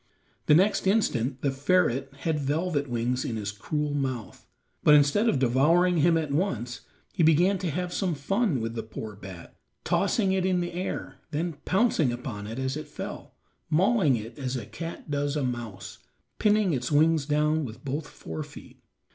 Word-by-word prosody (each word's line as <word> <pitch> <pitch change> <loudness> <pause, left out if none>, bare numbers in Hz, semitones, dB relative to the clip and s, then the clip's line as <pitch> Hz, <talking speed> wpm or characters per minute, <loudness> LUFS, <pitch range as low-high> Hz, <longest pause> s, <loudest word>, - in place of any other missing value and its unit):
The 150 - +7
next 195 +3 +3
instant 140 - +1
the 140 - +2
ferret 135 -2 +1
had 160 -2 0
Velvet 145 0 -1
Wings 120 +2 -1
in 115 - -3
his 105 -2 -3
cruel 150 +8 -2
mouth, 130 -7 -4 0.4
but 150 - +7
instead 150 +11 +4
of 145 - +2
devouring 155 +8 +3
him 165 +2 +4
at 155 -3 -2
once 125 - -1 0.3
he 180 - -1
began 175 +5 +4
to 180 - -2
have 180 +3 -3
some 185 -5 0
fun 175 - 0
with 115 0 -3
the 115 - -3
poor 110 -1 -8
bat, 95 -4 -11 0.3
tossing 195 -4 +1
it 190 -1 +1
in 185 -1 +2
the 175 0 -3
air, 170 -6 -4
then 165 +3 -2
pouncing 190 - +2
upon 120 -4 -5
it 115 +2 -6
as 130 0 -2
it 155 - -6
fell, - - -8 0.3
mauling 180 - +3
it 115 +3 -7
as 130 -1 -2
a 120 -5 -4
cat 160 +7 -7
does 145 0 0
a 150 - 0
mouse, 115 -6 -5 0.4
pinning 210 -4 +3
its 130 - -2
wings 155 0 +3
down 150 +1 +2
with 120 +1 -8
both 145 +3 -3
fore 80 -1 -7
feet. - - -11
145 Hz, 180 wpm, -27 LUFS, 125-175 Hz, 0.4 s, The